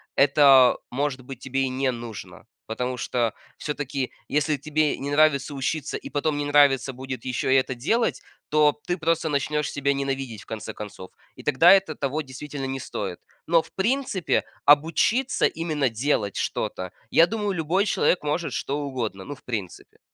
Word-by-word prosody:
это, 135 -3 +6
может 135 0 -2
быть, 130 -1 -9
тебе 135 0 -2
и 135 - 0
не 130 +1 0
нужно, 115 -3 -9 0.2
потому 125 +3 -3
что 120 -2 -1 0.2
все-таки, 140 -3 -3 0.2
если 150 +1 +1
тебе 155 0 0
не 140 - -4
нравится 145 -1 +3
учиться, 140 +2 -2
и - - -9
потом 145 +1 0
не 145 - -2
нравится 140 -2 +4
будет 130 +1 -7
еще 130 +1 +1
это 130 -1 +2
делать, 220 - 0 0.3
то 150 -1 +3
ты 175 0 -1
просто 165 -1 0
начнешь 150 +1 -1
себя 140 0 0
ненавидеть, 135 -5 -3
в - - -23
конце 110 0 -6
концов, 100 -3 -9 0.3
и - - -11
тогда 145 +5 +6
это 190 -5 +2
того, 140 +3 -2
действительно, 140 0 -7
не 135 0 -3
стоит. 95 -8 -5 0.3
Но 165 0 +4
в - - -18
принципе 225 -3 0 0.2
обучиться 165 - +3
именно 155 -5 -1
делать 115 -4 -1
что-то, 90 -1 -3 0.2
я 165 - +6
думаю 210 0 -2
любой 175 +4 +1
человек 180 - +2
может 150 +3 -2
что 140 +2 -2
угодно, 120 -9 -4
ну 145 - -6
в - - -22
принципе. 105 -8 -6
140 Hz, 165 wpm, -25 LUFS, 130-155 Hz, 0.3 s, это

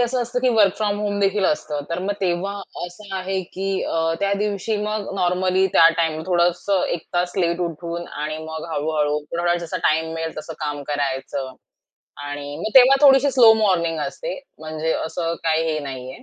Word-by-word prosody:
असं 245 +1 +1
असतं 240 +1 -2
की 255 - +3
वर्क 200 -3 +5
फ्रॉम 205 -1 0
होमदेखील 205 -1 +1
असतं, 150 -3 0
तर 170 - -1
मग 200 +2 -1
तेव्हा 180 +2 0 0.3
असं 195 +3 -10
आहे 190 0 -2
की 190 +1 -3 0.2
अ, - - -2 0.2
त्या 200 0 +1
दिवशी 210 +1 -1
मग 210 -1 -3
नॉर्मली 185 +1 +2
त्या 165 -4 +7
टाईम 160 -2 0
थोडंस 175 -1 +1 0.2
1 165 - -2
तास 175 0 0
लेट 170 -2 +1
उठून 170 0 -4
आणि 155 +1 -5
मग 160 0 -6
हळू-हळू 150 -1 0 0.2
थोडा 175 0 +2
जसा 165 - -4
टाईम 160 +1 0
मिळेल, 165 0 -4
तसं 160 +1 -7
काम 145 -1 -3
करायचं 135 -1 -3 0.7
आणि 145 0 -6
मग 215 +7 -4
तेव्हा 265 +1 +7
थोडीशी 270 +1 +6
स्लो 240 -4 +7
मॉर्निंग 170 -5 +1
असते. - - -5 0.2
म्हणजे 155 0 -2
असं 165 0 -2
काही 160 0 +2
हे 155 - -1
नाहीये. 130 0 -8
175 Hz, 175 wpm, -22 LUFS, 155-200 Hz, 0.7 s, त्या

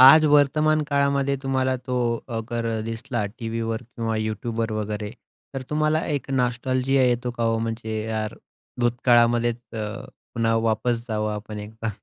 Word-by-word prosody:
आज 145 +5 +10
वर्तमानकाळामध्ये 145 -1 +3
तुम्हाला 130 -1 +1
तो 125 0 -4 0.4
अगर 115 +1 -2 0.2
दिसला 115 0 -3
टी-व्हीवर 115 0 -2
किंवा 115 -1 -3
YouTubeवर 110 +1 -2
वगैरे. 105 0 -3 0.4
तर 135 - -3
तुम्हाला 155 +1 +2
एक 140 -3 -2
नॉस्टॅल्जिया 130 +1 +1
येतो 125 0 +1
का 115 - 0
ओ? 115 0 +1
म्हणजे 110 -1 -3
यार 110 -1 -2 0.5
भूतकाळामध्येच 120 -1 +3
अ, 110 -1 -2 0.5
पुन्हा 115 -1 +2
वापस 115 +1 +1
जावं 105 -1 -1
आपण 105 0 -6
एकदा. 110 +2 -5
120 Hz, 130 wpm, -24 LUFS, 115-130 Hz, 0.5 s, आज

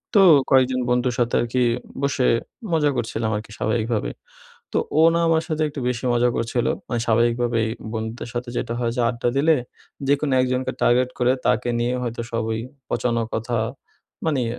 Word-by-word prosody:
তো 200 - +8 0.3
কয়েকজন 130 -1 +4
বন্ধুর 125 0 +1
সাথে 120 0 +1
আরকি 120 +1 0 0.4
বসে 140 -2 +1 0.4
মজা 155 -3 +3
করছিলাম 110 0 -2
আরকি 110 +1 -9
স্বাভাবিকভাবে। 110 - -1 0.6
তো - - +2 0.2
ও - - +7
না 170 - +2
আমার 160 0 +3
সাথে 155 -2 -2
একটু 145 - -7
বেশি 125 0 -3
মজা 120 +1 +3
করছিল। 115 +1 -1 0.2
মানে 120 -2 -1
স্বাভাবিকভাবেই 115 0 +2 0.3
বন্ধুদের 110 +2 -4
সাথে 120 0 -4
যেটা 115 - -2
হয় 120 -1 0
যে 125 - 0
আড্ডা 120 0 -1
দিলে 155 +3 +4 0.5
যেকোনো 140 0 +2
একজনকে 130 0 0
টার্গেট 125 +1 +3
করে 125 0 +3
তাকে 120 +3 +2
নিয়ে 120 +1 0
হয়তো 120 -1 -3
সবই 110 -1 -1 0.3
পচানো 120 -1 0
কথা 115 +2 -1 0.7
মানি, 145 -6 +1
120 Hz, 160 wpm, -23 LUFS, 115-130 Hz, 0.7 s, তো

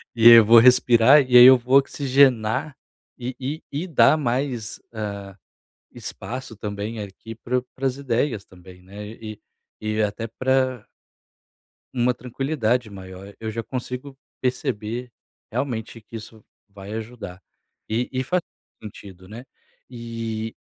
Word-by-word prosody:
E 115 0 +8
eu 115 -2 +9
vou 115 +2 +8
respirar 125 +2 +6
e 125 -2 +4
aí 120 - +11
eu 130 0 +9
vou 125 +3 +3
oxigenar 135 -2 +2 0.4
e 125 0 -5
e 140 +4 -5
e 155 +6 -3
dar 150 -1 +4
mais 125 -4 -3
ah, 100 -3 -6 0.6
espaço 130 -1 -8
também 105 +2 -5
aqui 105 +3 -9
pra 125 +3 -2
para 135 +1 -3
as 130 - -1
ideias 125 -4 -1
também 90 -1 -16
né, 100 +3 -10
e 110 -1 -8 0.4
e 110 0 -1
até 105 +2 -2
pra 130 +1 -1 1.1
Uma 125 -1 +1
tranquilidade 125 -2 -2
maior. 95 0 -11
Eu 110 0 -4
já 115 +1 -4
consigo 130 +3 -6 0.2
perceber 125 -1 -3 0.4
realmente 115 -2 -4
que 115 - -14
isso 110 -1 -10 0.3
vai 100 +1 -10
ajudar, 110 -5 -8 0.5
e 115 +3 -1
e 130 0 -1
faz 180 +7 0 0.4
sentido, 95 -3 -12
né, 110 +4 -9 0.5
eh 115 -2 -5
115 Hz, 135 wpm, -23 LUFS, 110-130 Hz, 1.1 s, aí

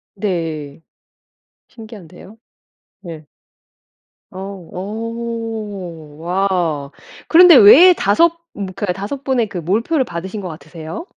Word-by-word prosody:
네. 165 -7 -4 0.9
신기한데요. 215 -3 -13 0.7
네. 165 -5 -10 1.1
어, 185 - -10
어. 205 -3 -7
와! 175 -5 -1 0.4
그런데 345 -1 +8
왜 305 - +8
5 210 - +3 0.3
분 200 - -5
그니까 195 -1 -3
5 205 +10 -6
분의 250 -5 0
그 185 - -7
몰표를 230 - 0
받으신 190 +1 -7
것 185 - -6
같으세요? 160 - -9
195 Hz, 170 characters per minute, -17 LUFS, 170-225 Hz, 1.1 s, 그런데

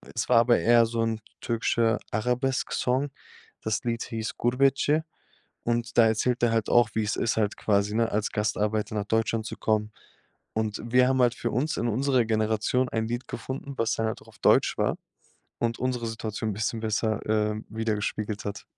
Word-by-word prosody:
Es - - -2
war - - +6
aber 120 +1 +4
eher 120 0 +5
so 115 0 -2
'n 115 -1 0 0.2
türkischer 115 -1 +1
Arabesk-Song. 125 +3 0 0.5
Das 110 -1 -1
Lied 115 -1 -1
hieß 110 -1 -4
„Gurbetçi“ 135 +5 +2 0.6
und 120 0 -1
da 115 - +8
erzählt 120 +3 0
er 120 -1 +3
halt 115 -2 0
auch, 120 -2 +5
wie 110 - +1
es 105 - -1
ist 115 - 0
halt 105 -1 0
quasi, 100 0 +1
ne, 115 0 +1
als 105 +1 0
Gastarbeiter 105 0 -1
nach 100 -1 -2
Deutschland 110 0 0
zu - - -6
kommen. 105 -1 0 0.6
Und, 110 -1 -2
wir 125 +2 +4
haben 130 -1 +2
halt 120 0 +3
für 120 - -3
uns, 140 +7 -1
in 120 - 0
unserer 130 +1 +2
Generation 110 +3 +1
ein 110 -1 -1
Lied 120 +2 -4
gefunden, 135 +1 -6
was 115 0 +1
dann 110 - 0
halt 110 - -4
auch - - -18
auf - - -19
Deutsch - - +4
war - - 0 0.6
und 115 0 -1
unsere 125 -2 -1
Situation 110 -1 -3
'n - - -3
bisschen 110 +2 -2
besser, 110 0 0
ähm, 105 0 0
widergespiegelt 105 -1 -2
hat. 100 - -5
115 Hz, 185 wpm, -27 LUFS, 110-120 Hz, 0.6 s, da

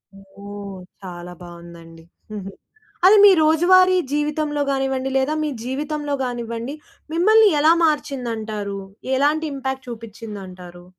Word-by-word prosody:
ఓహ్! 200 0 -10 0.3
చాలా 175 -1 -8
బావుందండి. 170 -1 -12 0.3
హుహు. 200 -2 -6 0.6
అది 405 +3 +8
మీ 410 - +10
రోజువారీ 370 +4 +5
జీవితంలో 295 0 -1
గానివ్వండి, 270 -1 -1
లేదా 270 +3 0
మీ 300 - -1
జీవితంలో 290 +3 -3
గానివ్వండి, 235 +1 -5 0.4
మిమ్మల్ని 430 +6 +5
ఎలా 310 +2 +6
మార్చిందంటారు? 225 -9 -2 0.4
ఎలాంటి 300 +4 +1
ఇంపాక్ట్ 265 -1 -5
చూపిచ్చిందంటారు? 200 -6 -9
255 Hz, 105 wpm, -21 LUFS, 200-300 Hz, 0.6 s, మీ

